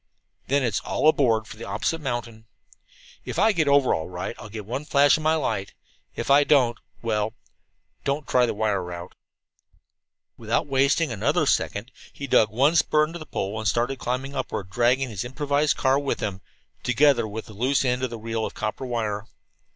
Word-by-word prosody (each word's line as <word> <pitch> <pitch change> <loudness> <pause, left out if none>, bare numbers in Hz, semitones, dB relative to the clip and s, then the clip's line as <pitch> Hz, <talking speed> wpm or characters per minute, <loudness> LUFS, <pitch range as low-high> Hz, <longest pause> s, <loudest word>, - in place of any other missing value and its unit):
Then 140 +1 +2
it's 115 -5 0
'All - - 0
aboard 115 -8 +3
for 105 - -11
the 115 - -8
opposite 165 +6 -2
mountain.' 120 -4 -4 0.8
"If - - -6
I 220 +2 +5
get 160 -7 +1
over 140 -2 +4
all 80 - -3
right 90 -1 -5
I'll 105 - -9
give 105 -1 -7
one 125 +7 -4
flash 145 -1 +4
of 155 - -3
my 155 +1 +3
light. 100 -10 -2 0.4
If - - -2
I 145 +1 +7
don't 130 -6 +3 0.2
well, 110 -1 -1 0.7
don't 140 +1 -2
try 125 -1 +3
the - - -2
wire 105 -2 0
route." 90 0 -7 1.3
Without - - 0
wasting 140 +2 +2
another 105 -3 +1
second 110 +6 0 0.2
he 140 - -7
dug 110 -4 +4
one 135 +9 +2
spur 155 -1 +4
into 165 +2 -8
the 155 - -10
pole 100 +3 -3
and 110 - -2
started 125 +3 0
climbing 130 +3 -3
upward, 100 -8 -4
dragging 125 +4 +2
his 100 -4 -4
improvised 145 +3 0
car 135 +1 +3
with 140 -1 -2
him, 100 -2 -3 0.4
together 125 -2 +3
with 110 +1 -6
the 105 - -12
loose 130 +6 +1
end 125 0 +1
of 130 - -1
the 115 - -6
reel 115 0 -3
of - - -4
copper 110 +4 -3
wire. 110 -3 -2
125 Hz, 190 wpm, -25 LUFS, 110-140 Hz, 1.3 s, I